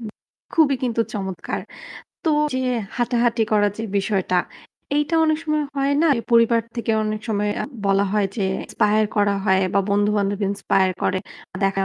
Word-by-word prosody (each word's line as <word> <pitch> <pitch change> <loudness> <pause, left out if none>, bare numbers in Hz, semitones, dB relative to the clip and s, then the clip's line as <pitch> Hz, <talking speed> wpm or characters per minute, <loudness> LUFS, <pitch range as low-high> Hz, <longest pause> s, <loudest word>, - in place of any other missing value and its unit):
হু, - - -11 0.5
খুবই 305 -4 +4
কিন্তু 235 -2 0
চমৎকার! 190 -3 -4 0.6
তো 325 - +3 0.2
যে - - 0 0.4
হাঁটাহাঁটি 240 -1 +1
করা 205 -1 +4
যে 220 - -4 0.2
বিষয়টা, 190 -2 0 0.6
এইটা 295 +3 0
অনেক 310 -1 +2
সময় 305 -1 0
হয় 275 +1 +1
না। - - +4 0.3
পরিবার 230 0 +5 0.2
থেকে 235 -1 -2
অনেক 215 0 -2
সময় 210 -1 0
আ - - -2 0.2
বলা 195 0 +3
হয় 210 -2 +2
যে 205 - 0 0.2
ইন্সপায়ার 215 0 +2
করা 205 -1 +3
হয় 190 -2 +3
বা 200 - +4
বন্ধুবান্ধব 205 -1 +1
ইন্সপায়ার 195 -1 +1
করে। 190 - +1 0.5
দেখায় 195 0 +1
215 Hz, 155 wpm, -22 LUFS, 200-240 Hz, 0.6 s, পরিবার